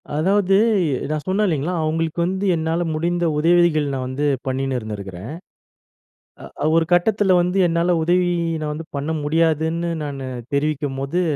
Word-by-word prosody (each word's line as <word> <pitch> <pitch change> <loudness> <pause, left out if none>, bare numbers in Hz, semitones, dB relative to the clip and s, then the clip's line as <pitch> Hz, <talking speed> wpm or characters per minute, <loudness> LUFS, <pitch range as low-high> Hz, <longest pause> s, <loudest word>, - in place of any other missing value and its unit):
அதாவது, 195 +4 +2 0.5
நான் 155 -1 -2
சொன்னேன் 200 +3 +1
இல்லேங்களா! 160 0 -1
அவுங்களுக்கு 160 +1 -1
வந்து 190 +2 -2
என்னால 165 +1 -1
முடிந்த 175 +2 0
உதவிகள், 165 -1 +3
நான் 130 -1 -3
வந்து 135 +3 -2 0.2
பண்ணின்னு 135 0 -1
இருந்திருக்கிறேன். 100 -1 -7 1.3
அ - - +2
ஒரு 165 - +4
கட்டத்தில 195 +2 +3
வந்து, 180 +2 0
என்னால 170 +1 +1
உதவி 175 +2 +2 0.3
நான் 150 -1 -3
வந்து 160 +2 -6
பண்ண 140 +3 -3
முடியாதுன்னு, 160 +2 +1
நானு 140 -2 -5 0.3
தெரிவிக்கும்போது, 145 +2 -1
160 Hz, 130 wpm, -21 LUFS, 145-175 Hz, 1.3 s, ஒரு